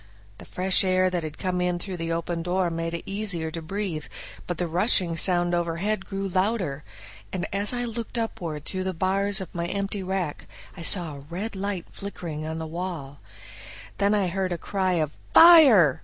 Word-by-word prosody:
The - - -11
fresh 185 +1 +3
air 185 0 +2
that 175 -1 -1
had 155 -1 -7
come 180 -1 -2
in 180 0 0
through 185 +1 -5
the 165 0 -3
open 165 0 -2
door 180 0 0
made 165 0 -3
it 170 - -6
easier 195 -6 +1
to 165 - -5
breathe, 175 -3 -4 0.4
but 175 - -3
the 180 - -1
rushing 175 0 +2
sound 175 +1 +3
overhead 175 +4 -1
grew 195 0 -3
louder, 185 -6 -1 0.5
and 185 -2 -3
as 200 +1 +4
I 245 -1 -2
looked 230 +1 -5
upward 165 -10 -4
through 185 0 -4
the 190 -1 -2
bars 195 +3 +2
of 185 - -8
my 170 0 -3
empty 200 +2 -2
rack 185 -5 -3 0.3
I 180 - -9
saw 165 -4 +1
a 140 - -12
red 200 +6 -5
light 195 -2 -3
flickering 165 -6 -6
on 160 0 -4
the 160 - -4
wall. 160 -4 -6 0.8
Then 200 +1 +3
I 200 -3 +1
heard 190 +1 -2
a 175 - -1
cry 190 +1 -1
of 155 -4 0 0.2
"Fire!" 275 - +8
180 Hz, 190 wpm, -25 LUFS, 165-195 Hz, 0.8 s, Fire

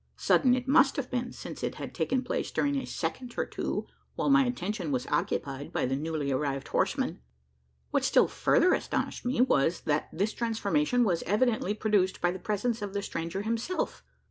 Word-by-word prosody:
Sudden 250 -3 +4
it 255 0 -4
must 275 +1 +5
have 265 -3 -3
been, 245 -1 -2
since - - -8
it - - -2
had - - -7
taken 260 0 0
place 250 - -2
during 285 0 0
a 270 - -1
second 235 +10 -4
or - - +1
two, - - -3 0.3
while 285 - +1
my 275 -1 +6
attention 210 -8 -2
was 125 -2 -1
occupied 140 0 -1
by - - 0
the 130 +1 0
newly 150 -1 -2
arrived 135 0 -1
horseman. - - 0 0.7
What - - +1
still - - +4
further - - +3
astonished - - -2
me, 245 0 +1
was, 165 - +2
that 150 0 0
this 200 +6 -1
transformation 245 +3 +1
was 180 -7 +1
evidently 210 0 +1
produced 205 -4 +1
by 175 - +2
the 185 - -6
presence 215 +4 -1
of 200 -1 -4
the 200 - -1
stranger 170 +4 -3
himself! 230 - -2
210 Hz, 185 wpm, -29 LUFS, 165-250 Hz, 0.7 s, my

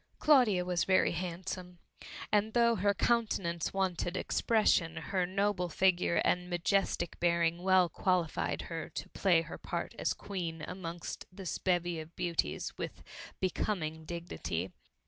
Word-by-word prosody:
Claudia 240 -12 +4
was 180 -1 +1
very 190 -1 +3
handsome, 180 +1 -5 0.5
and 210 +1 +2
though 235 -1 +4
her 200 0 +2
countenance 200 -7 0
wanted 185 -2 -1
expression, 190 -7 +2
her 180 +3 -1
noble 195 -1 0
figure 180 0 +2
and 180 0 +1
majestic 175 -1 0
bearing 170 0 +2
well 185 -1 +5
qualified 180 -1 0
her 165 -2 -5
to - - -6
play 175 -4 +3
her 165 - -8
part - - -4
as - - 0
Queen 165 -5 -4
amongst 175 -2 -6
this 185 -4 -5
bevy 175 -2 0
of 160 +1 -10
beauties, 170 - -2
with - - -5 0.4
becoming 170 -4 -1
dignity. 155 - -4
180 Hz, 130 wpm, -32 LUFS, 170-190 Hz, 0.5 s, well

